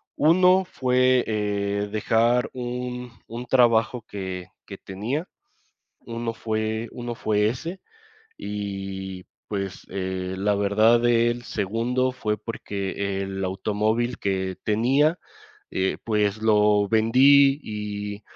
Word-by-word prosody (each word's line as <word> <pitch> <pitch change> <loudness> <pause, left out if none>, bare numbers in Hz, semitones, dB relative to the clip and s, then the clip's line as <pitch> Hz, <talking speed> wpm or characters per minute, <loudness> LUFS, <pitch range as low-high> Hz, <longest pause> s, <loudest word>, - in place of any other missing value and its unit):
uno 180 +4 +5
fue, 125 -3 +2
eh, 105 -1 -1
dejar 115 +3 +2
un 125 0 -5 0.2
un 120 +2 -6
trabajo 120 -2 +3
que 95 -2 -6 0.2
que 100 - -8
tenía, 120 - -4 0.7
uno 115 0 -4
fue 110 0 -2
uno 120 -1 -5
fue 105 -1 +1
ese. 165 +10 -6 0.6
Y 95 -2 -5 0.2
pues, 100 -2 -4
eh, 95 -1 -3
la 105 +1 +1
verdad, 110 +4 +3
el 120 0 +2
segundo 120 +6 -1
fue, 105 -4 -2
porque 100 -2 -4
el 95 0 -4
automóvil 110 +5 -1
que 95 -1 -2
tenía, 135 +10 +2 0.5
eh, 95 0 0
pues, 105 -1 0
lo 105 -1 +4
vendí 135 +5 +5
y 105 -1 -5
110 Hz, 110 wpm, -24 LUFS, 100-120 Hz, 0.7 s, uno